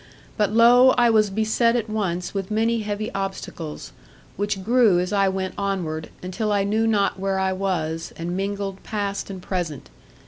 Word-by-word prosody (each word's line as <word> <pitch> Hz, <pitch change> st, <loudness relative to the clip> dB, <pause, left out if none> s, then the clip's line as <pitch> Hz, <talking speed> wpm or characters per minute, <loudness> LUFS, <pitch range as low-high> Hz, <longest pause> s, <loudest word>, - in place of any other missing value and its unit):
But, 210 Hz, -1 st, +1 dB
lo! 245 Hz, +3 st, +6 dB
I 240 Hz, -1 st, +5 dB
was 215 Hz, -2 st, +4 dB
beset 220 Hz, +3 st, +2 dB
at 230 Hz, -2 st, -1 dB
once 185 Hz, -5 st, -2 dB
with 195 Hz, -2 st, -3 dB
many 225 Hz, +2 st, +1 dB
heavy 210 Hz, 0 st, -4 dB
obstacles, 175 Hz, -, -5 dB, 0.4 s
which 205 Hz, -1 st, -2 dB
grew 230 Hz, -3 st, +4 dB
as 180 Hz, +2 st, -2 dB
I 195 Hz, -1 st, +3 dB
went 190 Hz, 0 st, -3 dB
onward, 175 Hz, -6 st, -2 dB
until 210 Hz, +4 st, -2 dB
I 200 Hz, -1 st, +2 dB
knew 215 Hz, +3 st, +1 dB
not 200 Hz, -3 st, +1 dB
where 195 Hz, 0 st, -1 dB
I 190 Hz, 0 st, +1 dB
was, 170 Hz, -4 st, -2 dB
and 170 Hz, +2 st, -3 dB
mingled 195 Hz, 0 st, -3 dB
past 200 Hz, -2 st, -3 dB
and 190 Hz, -1 st, -6 dB
present. 170 Hz, -8 st, -4 dB
200 Hz, 170 wpm, -23 LUFS, 185-215 Hz, 0.4 s, lo